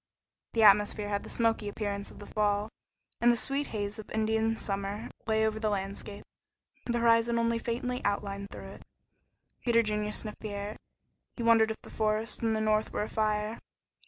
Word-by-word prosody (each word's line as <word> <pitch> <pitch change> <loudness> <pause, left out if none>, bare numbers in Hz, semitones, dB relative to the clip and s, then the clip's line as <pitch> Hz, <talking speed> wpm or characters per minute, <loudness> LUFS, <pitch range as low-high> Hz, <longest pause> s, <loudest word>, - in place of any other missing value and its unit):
The 225 - +3
atmosphere 205 0 +5
had 200 -1 0
the - - -10
smoky 225 -2 +1
appearance 200 -1 -3
of - - -13
the 205 - -9
fall, 210 0 0 0.5
and 240 0 +6
the 240 - +1
sweet 275 +4 +1
haze 205 -1 -4
of 215 - -9
Indian 220 +1 +1
summer 200 +2 -3 0.2
lay 220 0 +3
over 220 0 0
the 215 -1 +1
landscape, 200 0 -4 0.6
the 240 -1 +1
horizon 230 0 +4
only 230 0 +1
faintly 250 +2 -2
outlined 200 0 -1
through - - -9
it. - - -12 0.8
Peter 230 -1 +4
Junior 210 -1 -1
sniffed 215 0 -5
the 215 - -5
air. 205 +1 -5 0.6
He 235 - -3
wondered 225 -1 +5
if 220 - -3
the - - -12
forests 215 +1 0
in 225 -1 +2
the 220 - 0
north 215 0 +2
were - - -1
afire. 215 +1 -1
215 Hz, 180 wpm, -30 LUFS, 205-230 Hz, 0.8 s, and